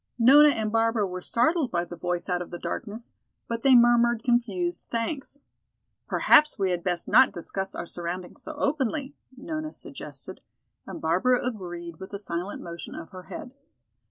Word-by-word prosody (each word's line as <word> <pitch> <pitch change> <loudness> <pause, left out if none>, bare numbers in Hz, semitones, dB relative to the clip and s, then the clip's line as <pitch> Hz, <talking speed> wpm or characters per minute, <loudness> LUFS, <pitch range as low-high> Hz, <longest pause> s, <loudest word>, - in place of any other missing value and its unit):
Nona 280 +6 +8
and 220 -6 -1
Barbara 225 -1 +2
were 185 -1 -5
startled 275 - +1
by 175 0 -1
the 175 - -8
voice 175 +1 -3
out 180 -2 0
of 175 - -6
the 175 - -6
darkness, 215 +6 -6 0.3
but 230 -1 -3
they 265 0 +6
murmured 240 -1 +5
confused 205 -8 0
thanks. 270 +4 -3 0.7
"Perhaps 300 0 +5
we 190 -3 +1
had 175 -1 -2
best 175 -2 -1
not 260 0 +6
discuss 190 +3 -4
our - - -4
surroundings 175 +1 -6
so 315 - -6
openly," 280 -1 -1 0.2
Nona 310 +3 -5
suggested, - - -10 0.5
and - - -7
Barbara 185 +11 +2
agreed 175 -8 -5
with 190 +2 -8
a - - -2
silent 180 -1 -4
motion 170 -1 -8
of 165 - -9
her 185 -2 -10
head. 250 - -8
215 Hz, 165 wpm, -26 LUFS, 180-250 Hz, 0.7 s, Nona